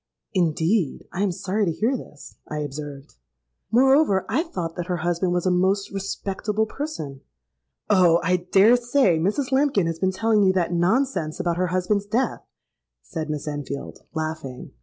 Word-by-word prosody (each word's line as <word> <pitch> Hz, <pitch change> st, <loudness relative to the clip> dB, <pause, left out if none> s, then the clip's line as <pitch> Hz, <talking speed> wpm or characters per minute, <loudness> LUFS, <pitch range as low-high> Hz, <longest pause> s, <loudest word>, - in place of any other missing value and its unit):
'—'Indeed! 170 Hz, -1 st, +1 dB
I 185 Hz, -, -2 dB
am 200 Hz, -2 st, +2 dB
sorry 195 Hz, +4 st, -1 dB
to 170 Hz, -, +1 dB
hear 225 Hz, +10 st, 0 dB
this,' 150 Hz, -, -10 dB
I 150 Hz, -, -4 dB
observed. 145 Hz, -, -7 dB, 0.5 s
'Moreover, 260 Hz, -3 st, +4 dB
I -, -, +1 dB
thought 180 Hz, -, -5 dB
that 175 Hz, -1 st, -4 dB
her 180 Hz, -, -1 dB
husband 175 Hz, +1 st, +1 dB
was 175 Hz, 0 st, 0 dB
a 185 Hz, -, +3 dB
most 190 Hz, +3 st, +1 dB
respectable 200 Hz, +2 st, -2 dB
person.'—'Oh! 155 Hz, -, -1 dB
I 180 Hz, +2 st, +3 dB
dare 195 Hz, +6 st, +5 dB
say 240 Hz, -, +2 dB
Mrs. 210 Hz, -, 0 dB
Lambkin 265 Hz, -, +3 dB
has 165 Hz, -1 st, -2 dB
been 190 Hz, -1 st, +1 dB
telling 215 Hz, +2 st, +2 dB
you 190 Hz, -2 st, +4 dB
that 175 Hz, -2 st, 0 dB
nonsense 180 Hz, -, +1 dB
about 170 Hz, -1 st, 0 dB
her 180 Hz, 0 st, +1 dB
husband's 185 Hz, +3 st, 0 dB
death,' 235 Hz, +3 st, 0 dB, 0.6 s
said 155 Hz, -, -5 dB
Miss 150 Hz, -1 st, -4 dB
Enfield, 145 Hz, -1 st, -5 dB, 0.2 s
laughing. 155 Hz, -5 st, -5 dB
185 Hz, 160 wpm, -24 LUFS, 160-210 Hz, 0.6 s, dare